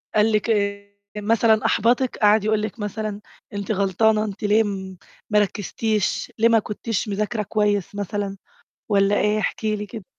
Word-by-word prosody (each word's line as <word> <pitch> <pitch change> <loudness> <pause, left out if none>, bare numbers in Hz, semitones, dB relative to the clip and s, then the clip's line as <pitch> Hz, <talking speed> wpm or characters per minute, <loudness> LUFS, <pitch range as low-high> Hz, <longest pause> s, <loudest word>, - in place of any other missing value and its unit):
قال 215 +1 +4
لِك 215 +2 0
إيه 200 -1 -1 0.2
مثلًا، 220 +1 +2
أحبطِك، 240 +4 +2
قعد 210 0 +4
يقول 215 0 +1
لِك 215 +1 -5
مثلًا 210 0 -4 0.3
أنتِ 200 +1 -3
غلطانة، 215 +2 +2
أنتِ 210 +1 -7
ليه 210 +2 +4
م 190 -2 -5 0.3
ما 210 0 +4
رَكزتيش، 210 +1 -1
ليه 230 +1 +5
ما 230 - +5
كُنتيش 215 +1 -3
مذاكرة 210 +2 -2
كويس 205 -2 0
مثلًا، 205 0 -3 0.5
والّا 200 0 +3
إيه؟ 210 +1 +2
احكي 215 0 -1
لي 210 0 -5
كده. 215 -1 -9
210 Hz, 160 wpm, -22 LUFS, 200-220 Hz, 0.5 s, ليه